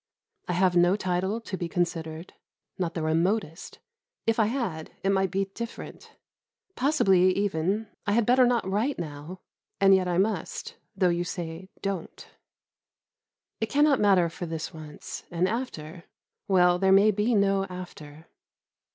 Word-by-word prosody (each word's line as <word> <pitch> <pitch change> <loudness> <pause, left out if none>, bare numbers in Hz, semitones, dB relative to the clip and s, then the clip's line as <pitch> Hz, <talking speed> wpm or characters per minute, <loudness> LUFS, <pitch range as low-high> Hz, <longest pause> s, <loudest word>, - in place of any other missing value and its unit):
I - - -1
have 180 0 +2
no 175 +2 +5
title 190 +2 -1
to 205 - -5
be 175 -2 -4
considered, 165 -1 -3 0.5
not 175 -3 -2
the 165 - -2
remotest; 165 +2 -1 0.5
if 225 0 +1
I 215 - +4
had, 210 -11 -3
it 195 - +2
might 190 -1 +2
be 195 +1 0
different. 235 +2 -8 0.6
Possibly, 195 - +3
even, 200 +2 0 0.2
I 205 - +2
had 230 0 +3
better 250 +1 +5
not 240 -5 +1
write 215 +9 0
now, 160 +2 -7 0.4
and 195 0 +6
yet 185 -1 +3
I 175 -1 0
must, 210 +4 -2 0.2
though 185 -2 +3
you 175 0 0
say 175 +1 -6
"Don't." 195 -4 -4 1.3
It 220 - -2
cannot 290 -1 +4
matter 195 -4 +4
for 170 +1 -6
this 160 -1 -5
once, 155 -2 -9
and 175 +2 +1
after 180 -8 -5 0.4
well, 180 -2 +4
there 190 0 +3
may 200 +3 +6
be 215 +4 +1
no 195 -1 +2
after. 165 -5 -10
185 Hz, 150 wpm, -27 LUFS, 170-210 Hz, 1.3 s, and